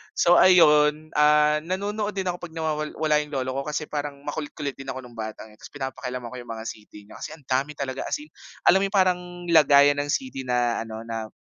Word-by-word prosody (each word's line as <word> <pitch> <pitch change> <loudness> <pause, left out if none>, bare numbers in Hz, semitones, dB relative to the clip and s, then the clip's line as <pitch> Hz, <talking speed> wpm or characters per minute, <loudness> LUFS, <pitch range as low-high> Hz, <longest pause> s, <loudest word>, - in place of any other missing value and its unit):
So 175 +1 +5
ayun, 155 -4 +5
ah, 150 0 +4
nanonood 205 +5 -3
din 190 - -1
ako 180 -1 -3
pag 170 -2 -10
nawawal 155 -1 -2
wala 155 -1 +2
yung 150 -1 -5
lolo 130 -1 -1
ko 140 - -5
kasi 150 0 -2
parang 145 -1 -4
makulit-kulit 145 -1 -4
din 135 0 -12
ako 130 -1 -5
nung 125 - -13
bata, 110 -2 -7
eh, 105 - -21
tas - - -11
pinapakialaman 130 -3 -6
ko 125 - -7
yung 120 - -11
mga 115 -1 -6
CD 105 -2 -9
niya. 105 - -14
Kasi 155 - -7
ang 155 - -21
dami 135 +3 -1
talaga 135 -1 -4
as - - -1
in 305 - -18 0.3
alam 190 - +6
yung 195 +1 -1
parang 185 -2 +3 0.3
lagayan 145 -2 +6
ng 145 - -2
CD 145 - -3
na 120 -1 +1
ano 110 0 -7
na, 115 -1 -5
145 Hz, 220 wpm, -25 LUFS, 130-155 Hz, 0.3 s, alam